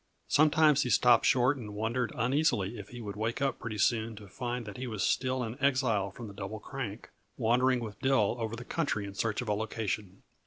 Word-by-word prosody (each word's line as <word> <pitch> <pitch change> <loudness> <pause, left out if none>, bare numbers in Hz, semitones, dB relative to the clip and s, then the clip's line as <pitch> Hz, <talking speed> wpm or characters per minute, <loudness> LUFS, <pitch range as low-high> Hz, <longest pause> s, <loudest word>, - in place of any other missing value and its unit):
Sometimes 155 0 +5
he 125 - -1
stopped 120 +1 +5
short 130 +2 +3
and 105 -5 -7
wondered 115 +2 -1
uneasily 120 -4 +1
if 100 - -9
he 120 -1 -8
would 100 -3 -6
wake 110 +4 -2
up 135 -1 0
pretty 110 -2 -5
soon 110 +2 +1
to 105 -1 -11
find 120 +4 -4
that 105 +3 -8
he 130 +1 -4
was 110 -4 -2
still 130 +1 +1
an 115 +1 -5
exile 130 -8 +2
from 115 +4 -9
the 100 - -9
Double 100 +2 -6
Crank, 120 -4 -6 0.3
wandering 125 +2 +3
with 105 -3 -7
Dill 130 -6 +2
over 115 0 -3
the 120 +1 -8
country 140 -11 -1
in 100 - -7
search 110 +3 -1
of - - -10
a 105 - +2
location. 105 -2 -3
115 Hz, 210 wpm, -30 LUFS, 105-130 Hz, 0.3 s, Sometimes